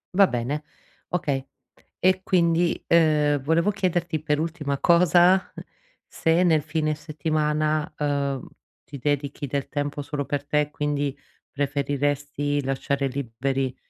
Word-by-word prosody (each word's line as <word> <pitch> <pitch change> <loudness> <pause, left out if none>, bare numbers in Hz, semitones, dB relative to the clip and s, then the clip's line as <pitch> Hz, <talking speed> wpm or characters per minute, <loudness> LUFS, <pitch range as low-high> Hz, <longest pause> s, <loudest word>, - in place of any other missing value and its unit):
Va 195 0 +7
bene, 125 +4 -2 0.5
okay. 145 -7 -1 0.5
E 185 0 +2
quindi, 170 -2 +2
uhm, 150 -3 +3
volevo 165 +8 +2
chiederti, 175 -5 -1
per 150 -1 0
ultima 155 -3 -2
cosa, 175 +3 +4 0.5
se 165 +2 +1
nel 160 -4 +4
fine 155 0 -1
settimana, 155 +1 -1
uhm, 140 -3 -1 0.4
ti 140 - -9
dedichi 145 0 -2
del 140 +1 -2
tempo 145 0 -3
solo 145 0 -3
per 145 0 -3
te, 150 0 +1
quindi, 145 -2 -2 0.3
preferiresti 145 0 -1
lasciare 135 +1 -1
liberi 130 0 -2
150 Hz, 115 wpm, -24 LUFS, 140-165 Hz, 0.5 s, Va